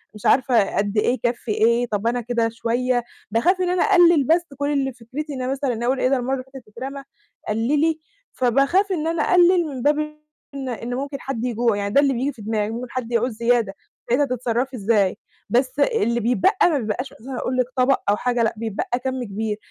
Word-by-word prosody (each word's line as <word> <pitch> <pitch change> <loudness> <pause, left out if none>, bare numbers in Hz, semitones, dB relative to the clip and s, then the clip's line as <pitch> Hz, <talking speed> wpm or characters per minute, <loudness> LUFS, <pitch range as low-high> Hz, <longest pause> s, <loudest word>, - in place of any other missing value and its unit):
مش 210 - -11
عارفة 245 -5 +3
قد 205 +1 0
إيه 210 - +3
يكفّي 240 -2 -1
إيه. 235 +3 +2
طَب 210 +1 -1
أنا 240 +1 0
كده 230 -1 0
شوية، 240 +2 -1 0.3
باخاف 360 - +2
إن 360 - +1
أنا 360 0 +2
أقلل، 340 -5 +5
بس 340 +2 +4
كل 285 +1 -1
اللي 270 -2 0
فكرتي 265 +6 -7
إن 260 - -5
أنا 255 +1 -2
مثلًا 255 -4 -2
أقُول 260 +2 +1
إيه، 255 - +2
ده 270 - +2
المَرّة 255 +2 -2
اللي 255 -1 -3
فاتت 255 -5 -11
اترمى، 270 +5 -7 0.5
قللي. 295 +9 +1 0.3
فباخاف 275 - +2
إن 325 -4 -1
أنا 330 -2 0
أقلل 355 -1 +4
من 265 -4 -6
باب 295 +2 +2 0.6
إن 270 -1 -4
إن 240 0 -4
ممكن 275 +1 -4
حد 250 -3 -3
يجوع 235 -2 +1
يعني، 200 0 -3
ده 280 - +6
اللي 275 -2 +2
بييجي 265 +4 -1
في 230 - -13
دماغي، 215 -1 -1
ممكن 240 +1 -5
حد 245 -2 -4
يعوز 235 +2 +1
زيادة، 235 -3 +1 0.3
ساعتها 260 +5 +3
هتتصرّفي 250 0 -2
إزاي؟ 205 -2 +1 0.3
بس 255 +3 +1
اللي 285 - +2
بيتبقى 355 - +3
ما 305 - +1
بيبقاش 240 +4 -3
أساسًا 255 +2 -8
أقول 255 - -2
لِك 255 - +3
طبق 255 +2 +3
أو 205 - +4
حاجة، 245 -1 0
لأ، 225 - +1
بيتبقى 225 +2 -2
كَم 260 -1 -2
كبير، 210 0 -3
250 Hz, 205 wpm, -22 LUFS, 230-275 Hz, 0.6 s, ده